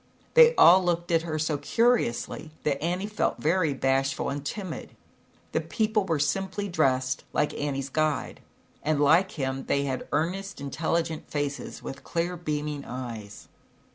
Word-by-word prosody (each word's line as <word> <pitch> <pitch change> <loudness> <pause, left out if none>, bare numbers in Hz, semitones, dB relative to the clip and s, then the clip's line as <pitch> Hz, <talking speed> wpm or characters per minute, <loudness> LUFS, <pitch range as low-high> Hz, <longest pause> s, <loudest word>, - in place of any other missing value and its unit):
They 480 0 +8
all 185 - +8
looked 175 -1 -1
at 165 -1 +4
her 160 -2 -3
so 155 -1 0
curiously 230 - +1
that 140 -2 0
Annie 180 +4 -1
felt 210 0 -1
very 165 0 +2
bashful 135 +1 0
and 140 0 -4
timid. 185 +2 -6 0.6
The 160 - 0
people 215 +5 0
were 165 -4 0
simply 190 +8 -1
dressed, 130 -7 +1
like 150 - +1
Annie's 140 -2 -3
guide, 155 +1 -1 0.4
and 155 -1 0
like 165 +8 +4
him, 135 -2 -3
they 140 - +1
had 130 -2 -3
earnest, 185 +6 -2
intelligent 160 +3 -2
faces, 145 -1 -4
with 135 - -7
clear 170 +1 -2
beaming 150 -3 -3
eyes. 115 -6 -7
155 Hz, 145 wpm, -27 LUFS, 140-180 Hz, 0.6 s, They